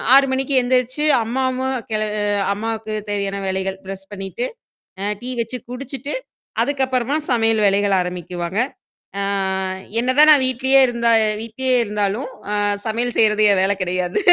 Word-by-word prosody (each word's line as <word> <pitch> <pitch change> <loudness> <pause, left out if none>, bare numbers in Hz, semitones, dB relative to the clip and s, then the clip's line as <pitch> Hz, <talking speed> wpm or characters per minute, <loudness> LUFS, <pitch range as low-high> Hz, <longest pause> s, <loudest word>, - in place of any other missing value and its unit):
6 275 0 +7
மணிக்கு 270 +1 0
எந்திரிச்சு, 255 +3 0 0.2
அம்மாவும் 260 +2 -1 0.2
கிள 215 0 0 0.5
அம்மாவுக்கு 220 +1 -4 0.2
தேவையான 200 -1 -2
வேலைகள், 190 0 -2
பிரஷ் 195 0 -8
பண்ணீட்டு, 195 +5 -4 0.5
அ - - -2 0.2
டீ 250 - -5
வச்சு 235 +2 -4
குடிச்சுட்டு, 275 +2 -6 0.5
அதுக்கப்புறமா 265 0 0
சமையல் 225 -2 +2
வேலைகள் 200 0 +3
ஆரம்பிக்குவாங்க. 180 +1 -4 0.6
ஆ - - 0 0.8
என்ன 250 +2 0
தான் 305 +1 +8
நான் 285 -3 +5
வீட்லேயே 265 +2 +3
இருந்தா 235 -1 0 0.3
வீட்லயே 255 +3 -1
இருந்தாலும், 210 +4 -2 0.2
அ - - +1 0.3
சமையல் 235 +2 -1
செய்றது 215 -1 +4
என் 190 - +3
வேலை 195 +1 +1
கிடையாது. 180 0 -1
225 Hz, 135 wpm, -20 LUFS, 200-255 Hz, 0.8 s, தான்